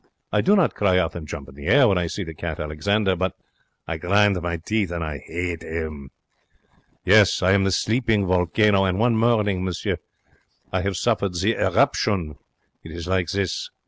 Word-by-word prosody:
I -, -, +2 dB
do 200 Hz, +3 st, +4 dB
not 190 Hz, -5 st, +2 dB
cry 95 Hz, -3 st, +2 dB
out 90 Hz, -, 0 dB
and 80 Hz, -3 st, -8 dB
jump 70 Hz, -2 st, -7 dB
in 70 Hz, -, -13 dB
the 70 Hz, +1 st, -9 dB
air 135 Hz, -3 st, +5 dB
when 95 Hz, -4 st, +2 dB
I 85 Hz, -, -1 dB
see 100 Hz, -, -4 dB
the 80 Hz, -2 st, -8 dB
cat 80 Hz, 0 st, -5 dB
Alexander, 95 Hz, +6 st, 0 dB
but 95 Hz, +1 st, -2 dB, 0.5 s
I 80 Hz, -, -3 dB
grind 100 Hz, +2 st, +2 dB
my 85 Hz, 0 st, -2 dB
teeth 100 Hz, +3 st, -1 dB
and 85 Hz, -1 st, -4 dB
I 75 Hz, -5 st, -6 dB
'ate 85 Hz, -1 st, -4 dB
'im. 80 Hz, -4 st, -6 dB, 1.0 s
Yes, 100 Hz, -1 st, +5 dB
I 95 Hz, -, +4 dB
am 95 Hz, 0 st, +3 dB
the 95 Hz, -, +1 dB
sleeping 110 Hz, 0 st, +1 dB
volcano, 95 Hz, +3 st, +2 dB
and 95 Hz, -1 st, 0 dB
one 115 Hz, +2 st, +2 dB
morning, 105 Hz, -5 st, +1 dB
monsieur, 90 Hz, -2 st, -2 dB, 0.8 s
I 95 Hz, -, +1 dB
have 95 Hz, -1 st, -2 dB
suffered 100 Hz, -5 st, 0 dB
the 100 Hz, +6 st, +1 dB
eruption. 95 Hz, -, 0 dB, 0.4 s
It 80 Hz, -, -10 dB
is 85 Hz, 0 st, -7 dB
like 95 Hz, -2 st, 0 dB
this. 100 Hz, -1 st, -2 dB
95 Hz, 190 wpm, -23 LUFS, 85-105 Hz, 1.0 s, air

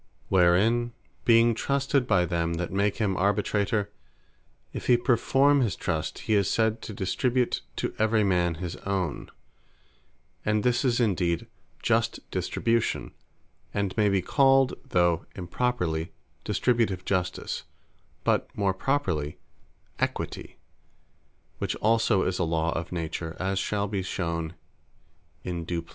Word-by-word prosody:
Wherein, 100 Hz, +7 st, +3 dB, 0.3 s
(being 115 Hz, 0 st, +5 dB
trusted 140 Hz, +1 st, 0 dB
by 90 Hz, -6 st, +3 dB
them 85 Hz, 0 st, -1 dB
that 85 Hz, +1 st, -3 dB
make 100 Hz, +2 st, +1 dB
him 100 Hz, -4 st, 0 dB
Arbitrator,) 100 Hz, +2 st, +1 dB, 0.8 s
if -, -, -6 dB
he 125 Hz, -, +6 dB
performe 135 Hz, +3 st, +3 dB
his 110 Hz, -7 st, 0 dB
Trust, 80 Hz, -2 st, -2 dB
he 110 Hz, -, +1 dB
is 100 Hz, -2 st, +3 dB
said 110 Hz, 0 st, +1 dB
to -, -, -7 dB
distribute 120 Hz, +6 st, 0 dB
to -, -, -2 dB
every 110 Hz, 0 st, +3 dB
man 90 Hz, -3 st, +2 dB
his 85 Hz, 0 st, -5 dB
own: 95 Hz, -6 st, -3 dB, 1.1 s
and 105 Hz, 0 st, +1 dB
his 125 Hz, +2 st, +2 dB
is 125 Hz, -2 st, +2 dB
indeed 90 Hz, -7 st, +1 dB, 0.4 s
Just -, -, +1 dB
Distribution, 115 Hz, -, -1 dB, 0.6 s
and 100 Hz, -2 st, -1 dB
may 105 Hz, -2 st, +3 dB
be 95 Hz, -2 st, +1 dB
called 135 Hz, +2 st, +4 dB, 0.2 s
(though 85 Hz, -2 st, +2 dB
improperly) 90 Hz, -4 st, -1 dB, 0.3 s
Distributive 115 Hz, -7 st, +1 dB
Justice; 90 Hz, -2 st, -2 dB, 0.6 s
but -, -, +1 dB
more 100 Hz, -2 st, +2 dB
properly 95 Hz, -, -1 dB, 0.6 s
Equity; -, -, -3 dB, 1.0 s
which -, -, -1 dB
also 110 Hz, -3 st, +2 dB
is 95 Hz, -, -1 dB
a -, -, +2 dB
Law 80 Hz, 0 st, 0 dB
of 85 Hz, +1 st, -4 dB
Nature, 80 Hz, -1 st, -4 dB
as 95 Hz, +1 st, 0 dB
shall 100 Hz, +1 st, -1 dB
be 100 Hz, -1 st, -2 dB
shewn 85 Hz, -2 st, -3 dB, 0.9 s
in 85 Hz, -2 st, -3 dB
due 85 Hz, 0 st, -3 dB
place. -, -, -23 dB
100 Hz, 130 wpm, -27 LUFS, 85-115 Hz, 1.1 s, he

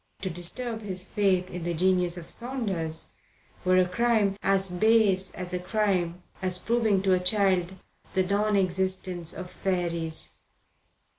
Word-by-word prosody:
To 190 Hz, -, -2 dB
disturb 220 Hz, +7 st, -1 dB
his 185 Hz, -3 st, -5 dB
faith 190 Hz, -3 st, +1 dB
in 180 Hz, -1 st, -5 dB
the 170 Hz, 0 st, -2 dB
genius 180 Hz, 0 st, +2 dB
of 170 Hz, -, -7 dB
Saunders 195 Hz, -11 st, -2 dB, 0.5 s
were 185 Hz, 0 st, +4 dB
a 185 Hz, -1 st, +4 dB
crime 215 Hz, 0 st, +2 dB
as 195 Hz, 0 st, +2 dB
base 195 Hz, 0 st, +3 dB
a 180 Hz, -1 st, -4 dB
crime 180 Hz, -3 st, 0 dB, 0.2 s
as 185 Hz, -1 st, +1 dB
proving 220 Hz, -2 st, +1 dB
to 190 Hz, -1 st, +3 dB
a 185 Hz, -, +3 dB
child 185 Hz, -1 st, +2 dB, 0.4 s
the 190 Hz, -, +3 dB
non 205 Hz, +3 st, +1 dB
existence 185 Hz, -2 st, 0 dB
of 180 Hz, -1 st, -7 dB
fairies. 170 Hz, -4 st, -2 dB
185 Hz, 140 wpm, -27 LUFS, 180-200 Hz, 0.5 s, were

